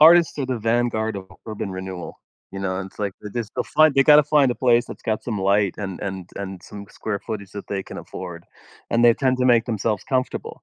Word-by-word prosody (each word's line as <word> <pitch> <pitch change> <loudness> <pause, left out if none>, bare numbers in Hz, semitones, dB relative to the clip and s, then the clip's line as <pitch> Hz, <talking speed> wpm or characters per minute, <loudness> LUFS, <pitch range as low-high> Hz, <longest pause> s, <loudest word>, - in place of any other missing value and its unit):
artists 165 0 +7
are 135 - -1
the 130 -2 -2
vanguard 115 -1 0
of 95 -1 -7 0.2
urban 105 -2 -4
renewal. 95 -1 -6 0.3
You 95 - -5
know? 95 -1 -2
And 95 - -4
it's - - -24
like, 100 -2 -1
this 105 +1 -4
they'll - - 0
find 155 -2 +4
they 135 - +6
gotta 150 +1 +7
find 145 -3 +4
a - - 0
place 120 -1 +3
that's - - -10
got 110 -1 -1
some 110 -5 -3
light 100 0 +2
and 95 -4 -5
and 95 -2 -5
and 95 -2 -5
some 100 -1 -10
square 105 -2 -4
footage 100 -3 -6
that 100 - -7
they 100 -1 -2
can - - -9
afford, 85 -2 -8 0.5
and 115 +1 +3
they 120 -1 +7
tend 130 0 +1
to 125 - +1
make 120 -3 +5
themselves 110 -3 -1
comfortable. 130 -1 -2
110 Hz, 230 wpm, -23 LUFS, 95-125 Hz, 0.5 s, artists